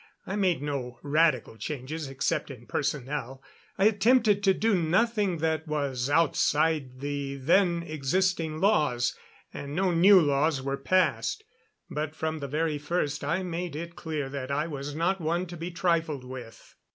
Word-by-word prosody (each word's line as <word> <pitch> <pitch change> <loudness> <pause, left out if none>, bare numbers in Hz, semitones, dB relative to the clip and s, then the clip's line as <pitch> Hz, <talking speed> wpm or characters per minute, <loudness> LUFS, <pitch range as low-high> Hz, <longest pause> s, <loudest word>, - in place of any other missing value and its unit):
I 195 - -3
made 185 -8 +1
no 130 -4 -4
radical 150 -5 +2
changes 145 +5 -5
except 135 +2 -1
in 125 -3 -10
personnel. 135 -1 -3 0.3
I 195 - +3
attempted 215 0 +4
to 195 - +5
do 225 0 +1
nothing 195 +2 +2
that 160 0 -1
was 140 -4 -1
outside 150 -3 +2
the 140 -1 -3
then 170 +5 +2
existing 160 +1 0
laws, 150 - +2 0.4
and 140 +1 -6
no 185 +1 +2
new 185 +3 +7
laws 145 -1 +2
were 135 +1 -2
passed. 185 - +1 0.4
But 155 +1 -4
from 160 0 -2
the 140 - -4
very 150 +1 -1
first 150 -1 -2
I 170 +6 0
made 175 -2 -4
it 170 +2 -6
clear 155 -4 -3
that 135 -1 -5
I 145 +2 0
was 145 -2 -5
not 175 +4 0
one 170 +3 0
to 175 -1 -9
be 170 +1 -5
trifled 165 -5 0
with. 125 -3 -10
155 Hz, 155 wpm, -28 LUFS, 140-175 Hz, 0.4 s, new